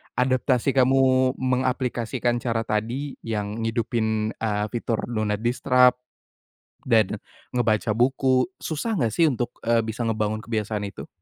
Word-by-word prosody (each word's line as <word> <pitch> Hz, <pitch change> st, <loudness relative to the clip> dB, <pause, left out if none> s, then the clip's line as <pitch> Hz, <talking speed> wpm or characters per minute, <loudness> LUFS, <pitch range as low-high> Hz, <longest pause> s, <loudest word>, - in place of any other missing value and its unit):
Adaptasi 130 Hz, +1 st, +2 dB
kamu 130 Hz, 0 st, +4 dB
mengaplikasikan 125 Hz, -2 st, 0 dB
cara 115 Hz, -2 st, -1 dB
tadi 115 Hz, +7 st, -2 dB
yang 105 Hz, -1 st, -3 dB
ngidupin, 110 Hz, -1 st, -1 dB
eee, 105 Hz, -2 st, -2 dB
fitur 115 Hz, -1 st, -2 dB
do 115 Hz, -3 st, -3 dB
not 105 Hz, +1 st, -2 dB
disturb 125 Hz, +1 st, +3 dB, 0.9 s
dan 110 Hz, -5 st, +3 dB, 0.3 s
ngebaca 110 Hz, -3 st, +1 dB
buku, 130 Hz, +2 st, +2 dB
susah 210 Hz, +8 st, -2 dB
enggak 120 Hz, -, +1 dB
sih 165 Hz, -, +3 dB
untuk, 125 Hz, -4 st, -1 dB, 0.2 s
eee, 115 Hz, 0 st, +3 dB
bisa 115 Hz, +2 st, -3 dB
ngebangun 110 Hz, -1 st, -1 dB
kebiasaan 110 Hz, -2 st, -3 dB
itu? 100 Hz, -, -9 dB
120 Hz, 130 wpm, -24 LUFS, 110-130 Hz, 0.9 s, kamu